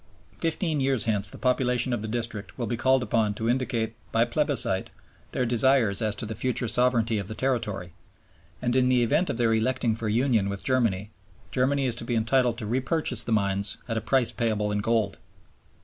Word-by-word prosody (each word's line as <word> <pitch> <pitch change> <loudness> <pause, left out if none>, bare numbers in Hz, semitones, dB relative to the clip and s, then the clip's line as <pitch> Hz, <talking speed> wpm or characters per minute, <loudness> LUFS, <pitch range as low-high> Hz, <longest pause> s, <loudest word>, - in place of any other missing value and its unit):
Fifteen 165 -2 -1
years 135 -3 +1
hence 105 -3 0
the - - -8
population 125 -1 +1
of 120 - -2
the 110 - -3
district 115 -2 -4
will 120 - -2
be 120 - -2
called 130 +2 +2
upon 110 -2 0
to 110 +2 -3
indicate 120 -3 0 0.2
by 115 +1 +3
plebiscite 120 -7 +1 0.4
their 125 - 0
desires 120 -3 +3
as 105 -2 0
to 105 - -4
the 110 - -4
future 125 +1 -1
sovereignty 115 -1 +2
of 100 - -5
the 110 - -5
territory; 105 -10 -2 0.7
and, 120 0 0
in 130 -1 +3
the 125 -1 +3
event 145 +10 +1
of - - -2
their 115 -2 +2
electing 115 +1 +1
for 110 0 -3
union 115 -3 +2
with 100 0 -5
Germany, 110 -6 0 0.4
Germany 135 +2 +1
is 125 - 0
to - - -4
be 120 0 -2
entitled 120 +1 +2
to 115 - -5
repurchase 125 +1 0
the - - -5
mines 100 -1 +1
at 115 - -2
a 110 - -1
price 125 +2 +2
payable 105 -3 -1
in 105 - 0
gold. 110 0 0
115 Hz, 195 wpm, -26 LUFS, 110-130 Hz, 0.7 s, by